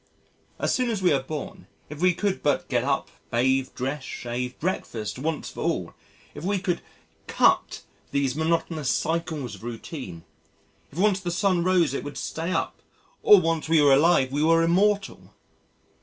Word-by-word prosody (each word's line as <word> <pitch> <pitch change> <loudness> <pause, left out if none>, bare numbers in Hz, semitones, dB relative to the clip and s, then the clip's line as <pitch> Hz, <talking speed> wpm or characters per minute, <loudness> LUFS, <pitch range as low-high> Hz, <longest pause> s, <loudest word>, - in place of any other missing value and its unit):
As - - 0
soon 250 -1 +1
as 210 -5 -2
we 180 - +4
are 135 - +1
born, 145 +2 -7 0.2
if 150 0 -9
we 180 -1 +4
could 200 0 -1
but 145 - +1
get - - 0
up, - - -1 0.2
bathe, 130 +2 +1
dress, 135 +3 -3
shave, 125 +1 -5
breakfast 125 - -3
once 155 +2 -3
for - - -11
all, - - -1 0.4
if - - -9
we 200 +2 0
could 180 -2 -2 0.5
"cut" - - +2 0.3
these 140 -2 0
monotonous 160 -2 0
cycles 160 -7 -1
of 100 - -11
routine. 115 - -7 0.7
If 145 - -13
once 200 +1 +3
the 185 -2 -4
sun 180 -1 +1
rose 180 -6 +3
it - - -3
would 145 0 -7
stay 165 +3 -3
up, - - -2 0.4
or 210 - +8
once 165 -2 -1
we 165 -1 +5
were 145 -2 +6
alive 140 -2 +4
we 145 +2 -1
were 165 +1 +4
immortal! 195 +4 +1
160 Hz, 170 wpm, -25 LUFS, 135-180 Hz, 0.7 s, or